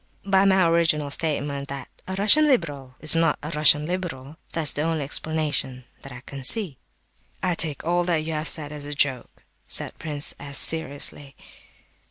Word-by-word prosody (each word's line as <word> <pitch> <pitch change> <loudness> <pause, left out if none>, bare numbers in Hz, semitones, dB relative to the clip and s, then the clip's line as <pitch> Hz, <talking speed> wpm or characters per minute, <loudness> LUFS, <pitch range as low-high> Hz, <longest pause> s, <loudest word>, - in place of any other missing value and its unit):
_ - - -7
By 190 0 +3
my 190 -3 +3
original 165 -3 +1
statement 140 -2 -3
that 140 -2 -8 0.2
a 190 - -5
Russian 215 +10 +6
liberal 145 - -2
is 155 +1 +7
not 165 -2 +1
a 150 - -6
Russian 150 -1 +3
liberal—that's 160 -3 -2
the 145 - -4
only 160 -1 -2
explanation 145 -3 -3 0.2
that 135 - -12
I 125 0 -11
can 135 +1 -11
see." 180 - +1 0.6
"I 180 -1 0
take 155 -4 -3
all 175 +1 0
that 165 -3 -1
you 160 +1 -5
have 155 +1 -3
said 150 -2 -1
as 145 -1 -7
a 145 - -6
joke," 135 -4 -2 0.2
said - - -2
Prince 150 -3 +2
S. 140 0 0
seriously. 145 -3 +2
150 Hz, 175 wpm, -23 LUFS, 140-170 Hz, 0.6 s, is